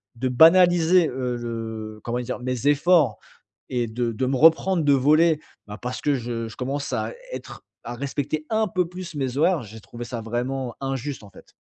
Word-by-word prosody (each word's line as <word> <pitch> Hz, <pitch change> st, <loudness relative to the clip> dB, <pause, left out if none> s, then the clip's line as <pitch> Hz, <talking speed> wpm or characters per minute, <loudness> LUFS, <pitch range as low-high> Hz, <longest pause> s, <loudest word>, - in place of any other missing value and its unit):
de 130 Hz, +2 st, -2 dB
banaliser, 170 Hz, +3 st, +5 dB
heu, 125 Hz, -1 st, -3 dB
le 110 Hz, -2 st, -6 dB
comment 120 Hz, +1 st, -2 dB
dire? 125 Hz, +1 st, -5 dB
Mes 125 Hz, +1 st, -2 dB
efforts 145 Hz, -, +3 dB, 0.5 s
et 120 Hz, -2 st, 0 dB
de 115 Hz, +1 st, -2 dB
de 120 Hz, +4 st, -1 dB
me 135 Hz, -, 0 dB
reprendre 165 Hz, +4 st, +4 dB
de 145 Hz, -1 st, +4 dB
volée, 155 Hz, +4 st, +4 dB, 0.3 s
bah, 105 Hz, 0 st, -8 dB
parce 125 Hz, +1 st, -4 dB
que 145 Hz, -1 st, +1 dB
je 115 Hz, -2 st, -4 dB
je 110 Hz, -, -12 dB
commence 140 Hz, +2 st, -3 dB
à -, -, -2 dB, 0.2 s
être -, -, -8 dB, 0.2 s
à 120 Hz, -, -6 dB
respecter 140 Hz, +3 st, -3 dB
un 220 Hz, 0 st, +1 dB
peu 180 Hz, -2 st, 0 dB
plus 180 Hz, -2 st, -8 dB
mes 135 Hz, -2 st, -2 dB
horaires. 165 Hz, +2 st, +3 dB
J'ai 110 Hz, +1 st, -11 dB
trouvé 120 Hz, +3 st, -9 dB
ça 120 Hz, 0 st, -5 dB
vraiment 120 Hz, +2 st, -3 dB
injuste, 135 Hz, -1 st, -4 dB
en 100 Hz, -, -13 dB
fait. -, -, -18 dB
130 Hz, 190 wpm, -24 LUFS, 120-155 Hz, 0.5 s, banaliser